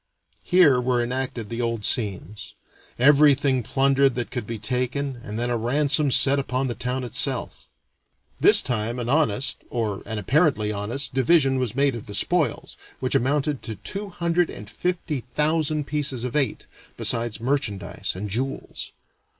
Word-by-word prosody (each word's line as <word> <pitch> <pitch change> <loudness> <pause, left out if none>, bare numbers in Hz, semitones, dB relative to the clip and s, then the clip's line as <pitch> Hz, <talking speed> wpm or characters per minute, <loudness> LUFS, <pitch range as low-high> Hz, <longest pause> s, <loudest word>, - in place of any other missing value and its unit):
Here 155 -9 +4
were 125 -1 +1
enacted 125 -3 -3
the 115 +1 -3
old 115 -3 -2
scenes. 105 -3 -3 0.4
Everything 140 -1 +4
plundered 135 +2 +2
that 120 -2 -3
could 120 -5 -4
be 115 - -4
taken, 125 +4 -2
and 105 +1 -6
then 120 +1 -1
a 120 - +1
ransom 140 +5 +1
set 135 +2 +3
upon 130 0 -1
the 125 - -2
town 125 +2 -3
itself. 120 - -2 0.7
This - - +6
time 115 -1 -2
an 120 -1 -3
honest, 140 -4 +1
or 110 -5 -2
an 110 - -4
apparently 110 - +2
honest, 105 +8 -3
division 135 0 +3
was 120 -3 -2
made 140 0 +2
of 115 -2 -7
the 105 - -4
spoils, 160 - 0 0.2
which - - -1
amounted 145 +2 +1
to 110 - -5
two 195 - -5
hundred 170 -1 0
and 105 - -9
fifty 170 - -2 0.2
thousand 155 -1 +1
pieces 140 -5 -1
of 125 +1 -4
eight, 135 -7 0 0.3
besides 115 -2 0
merchandise 110 -7 -2
and 100 +3 -4
jewels. 130 +6 -3
130 Hz, 155 wpm, -24 LUFS, 115-145 Hz, 0.7 s, This